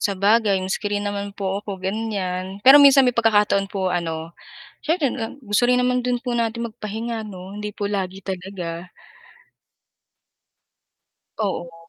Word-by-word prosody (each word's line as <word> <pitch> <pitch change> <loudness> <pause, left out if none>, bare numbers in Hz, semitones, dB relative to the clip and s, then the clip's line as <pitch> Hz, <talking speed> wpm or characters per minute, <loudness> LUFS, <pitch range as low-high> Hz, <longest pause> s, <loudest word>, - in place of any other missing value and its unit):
Sabagay 205 +1 +2
maski 195 +2 -2
rin 205 0 -2
naman 200 0 -4
po 195 0 -2
ako 200 -1 -6
ganyan, 190 -1 -3
pero 275 +2 +10
minsan 275 -1 +7
may 250 - +3
pagkakataon 210 -3 +3
po 190 -2 -1
ano 165 -1 -3 0.5
siyempre 320 -3 +1
dun 235 +3 -6
gusto 210 +1 +1
rin 250 0 +3
naman 250 0 +1
dun 245 -1 0
po 245 -2 -2
natin 235 0 -1
magpahinga 220 +1 -5
'no, 190 -1 -9
hindi 210 0 -5
po 205 0 -3
lagi 195 -2 -3
talaga. 180 -2 -6 2.5
Oo. 170 -5 -4
205 Hz, 140 wpm, -22 LUFS, 190-230 Hz, 2.5 s, pero